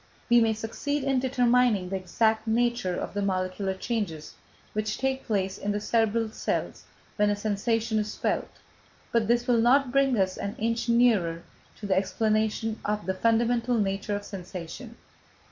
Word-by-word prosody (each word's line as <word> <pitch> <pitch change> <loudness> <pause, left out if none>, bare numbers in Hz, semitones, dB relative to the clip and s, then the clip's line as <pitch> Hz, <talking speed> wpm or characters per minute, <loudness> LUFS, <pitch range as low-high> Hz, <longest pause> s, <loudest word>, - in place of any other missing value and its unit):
We 240 0 +7
may 225 -1 +3
succeed 265 +6 -3
in 270 -1 +2
determining 245 -6 +2
the 195 - -2
exact 220 +4 0
nature 235 -4 +1
of - - -5
the 205 - -2
molecular 190 0 -1
changes 190 -8 -3 0.4
which 215 0 -2
take 265 0 -2
place 195 -3 -1
in 205 +1 -1
the 205 - -1
cerebral 225 0 +1
cells - - -3 0.3
when 210 -1 +3
a 205 - +1
sensation 220 +2 0
is 210 0 -3
felt, - - -1 0.6
but 230 -2 +2
this 240 +1 +2
will 240 -3 +3
not 255 +2 +4
bring 270 -2 +3
us 185 -2 +1
an 200 - -4
inch 230 +2 -1
nearer 210 -9 +3 0.3
to 210 - -9
the 195 -2 +1
explanation 215 +2 0
of 210 -2 -2
the 190 - 0
fundamental 235 +3 +2
nature 200 0 -1
of 205 0 -5
sensation." 185 +5 -8
220 Hz, 160 wpm, -27 LUFS, 200-235 Hz, 0.6 s, We